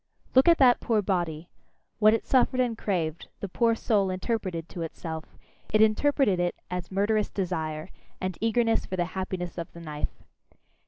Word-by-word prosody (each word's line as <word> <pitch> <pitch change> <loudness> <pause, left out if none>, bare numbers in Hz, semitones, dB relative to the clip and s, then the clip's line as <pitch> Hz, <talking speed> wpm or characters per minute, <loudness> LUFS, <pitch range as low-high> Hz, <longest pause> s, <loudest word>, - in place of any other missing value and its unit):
Look 260 +4 +6
at 335 -1 +7
that 250 -3 +6
poor 220 -3 +1
body! 175 -4 -1 0.5
What 215 0 +6
it - - -4
suffered 255 0 +3
and 245 -3 +1
craved, 170 -7 -2
the 200 - -4
poor 230 +4 +2
soul 205 -4 +1
interpreted 185 -3 -2
to 175 - -7
itself 160 -1 -5 0.5
it 215 - +3
interpreted 220 -1 +3
it 175 0 0 0.2
as 180 -1 -4
murderous 205 +2 +1
desire, 160 -4 -3 0.3
and 185 -1 -3
eagerness 225 0 +2
for 185 - -3
the 175 -1 0
happiness 185 -2 -4
of 165 - -6
the 170 - -10
knife. 150 -3 -5
190 Hz, 165 wpm, -27 LUFS, 170-225 Hz, 0.5 s, at